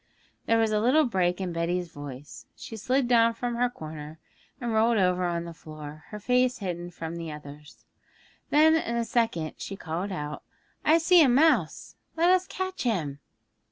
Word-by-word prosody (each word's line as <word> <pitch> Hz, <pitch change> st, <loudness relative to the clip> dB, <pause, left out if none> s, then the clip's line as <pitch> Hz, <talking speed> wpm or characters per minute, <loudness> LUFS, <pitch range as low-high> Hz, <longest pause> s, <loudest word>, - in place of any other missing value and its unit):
There 230 Hz, -, +4 dB
was 225 Hz, -1 st, +2 dB
a 210 Hz, -, +2 dB
little 265 Hz, +8 st, +4 dB
break 185 Hz, -6 st, 0 dB
in 185 Hz, -3 st, -3 dB
Betty's 170 Hz, +1 st, -1 dB
voice; 145 Hz, -2 st, -10 dB
she 225 Hz, -, -9 dB
slid 250 Hz, +4 st, 0 dB
down 230 Hz, -1 st, +4 dB
from 240 Hz, +1 st, -3 dB
her 245 Hz, +1 st, +1 dB
corner, 155 Hz, -6 st, -9 dB, 0.4 s
and 240 Hz, -3 st, -2 dB
rolled 225 Hz, +1 st, +3 dB
over 180 Hz, -2 st, +2 dB
on 170 Hz, -1 st, -1 dB
the 170 Hz, -, -7 dB
floor, 155 Hz, -1 st, -10 dB
her 210 Hz, -, -7 dB
face 250 Hz, +3 st, +2 dB
hidden 175 Hz, -3 st, -4 dB
from 165 Hz, -1 st, -6 dB
the 165 Hz, -2 st, -5 dB
others. 150 Hz, 0 st, -12 dB, 0.6 s
Then 315 Hz, +2 st, +5 dB
in 235 Hz, -8 st, -1 dB
a 235 Hz, -1 st, 0 dB
second 225 Hz, -11 st, 0 dB
she 195 Hz, -, -6 dB
called 180 Hz, +3 st, -4 dB
out, 150 Hz, -4 st, -5 dB, 0.4 s
'I 315 Hz, +2 st, +5 dB
see 340 Hz, +1 st, +5 dB
a 285 Hz, -, +6 dB
mouse! 300 Hz, +6 st, +2 dB, 0.2 s
Let 340 Hz, +2 st, +4 dB
us 370 Hz, 0 st, +3 dB
catch 375 Hz, 0 st, -4 dB
him!' 160 Hz, -, -1 dB
200 Hz, 180 wpm, -27 LUFS, 165-245 Hz, 0.6 s, a